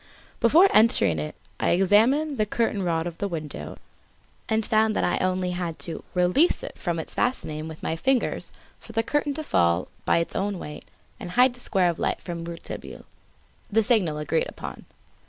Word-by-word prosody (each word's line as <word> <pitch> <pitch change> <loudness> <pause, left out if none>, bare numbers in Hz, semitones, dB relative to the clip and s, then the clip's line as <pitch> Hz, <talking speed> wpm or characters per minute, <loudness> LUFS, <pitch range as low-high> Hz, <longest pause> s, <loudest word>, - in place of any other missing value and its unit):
Before 325 +11 +6
entering 105 - +4
it 75 0 -5 0.2
I - - +1
examined 230 - +3
the 215 - +2
curtain 225 -2 0
cord 165 -2 0
of 170 -1 -6
the 200 - -1
window 155 -5 -6 0.7
and 220 -1 +1
found 220 0 +2
that - - +1
I - - +1
had - - -3
only 185 -1 0 0.2
to 165 - -5
release 180 - +3
it - - -7
from 175 -3 -2
its 160 - -5
fastening 155 -11 -1
with 160 -1 -10
my 160 - -1
fingers 260 +8 0 0.3
for 225 - -13
the 225 +1 +1
curtain 290 +2 0
to 310 - -3
fall 85 - +1
by - - +3
its 170 - -1
own 200 0 -1
weight 150 -3 -8 0.3
and 175 - -7
hide 250 +6 +4
the 250 - -17
square 190 -6 +2
of 170 - -10
light - - 0
from 170 -2 -6
Rouletabille 170 0 -8 0.7
the 225 +2 +3
signal 200 -10 +2
agreed 150 +2 0
upon. - - -8
190 Hz, 185 wpm, -25 LUFS, 165-230 Hz, 0.7 s, Before